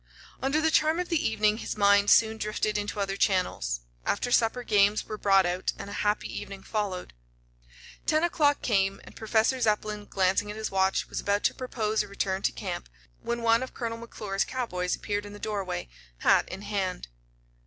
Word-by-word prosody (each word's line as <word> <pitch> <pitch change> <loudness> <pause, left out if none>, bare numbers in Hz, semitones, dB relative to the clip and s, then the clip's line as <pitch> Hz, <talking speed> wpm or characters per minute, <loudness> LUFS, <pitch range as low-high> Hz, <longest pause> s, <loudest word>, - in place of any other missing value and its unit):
Under 275 +4 +1
the 320 0 +2
charm 315 +2 +3
of 360 - -2
the 335 -3 +1
evening 215 0 +2
his - - -5
mind 200 0 +5
soon 220 -1 +5
drifted 215 0 -1
into 205 0 -2
other 195 -1 -1
channels. 180 - 0 0.2
After 245 +4 -1
supper 240 +1 +2
games 205 -1 +3
were 215 - -5
brought 195 -2 +4
out 180 +1 -1
and 200 - -7
a - - -3
happy 210 0 0
evening 195 -1 -9
followed. 200 -4 -3 0.9
Ten 310 +1 +3
o'clock 295 -4 +2
came, 195 -3 +1
and - - -14
Professor 225 +3 +1
Zepplin, 210 -1 0
glancing 195 +1 +1
at 210 - -6
his 220 -1 -3
watch, 190 0 +1
was - - -4
about 200 0 0
to - - +3
propose 220 -4 -1
a 210 - -5
return 195 -1 -2
to - - +1
camp, - - -5 0.3
when 235 0 -3
one 230 +1 +4
of 260 - -6
Colonel 230 -1 -3
McClure's 205 -4 -3
cowboys 180 -9 -2
appeared 205 -1 -3
in 205 0 -9
the - - -9
doorway, 200 - -3 0.3
hat - - +4
in 190 +2 -7
hand. 195 - -2
210 Hz, 185 wpm, -28 LUFS, 195-230 Hz, 0.9 s, mind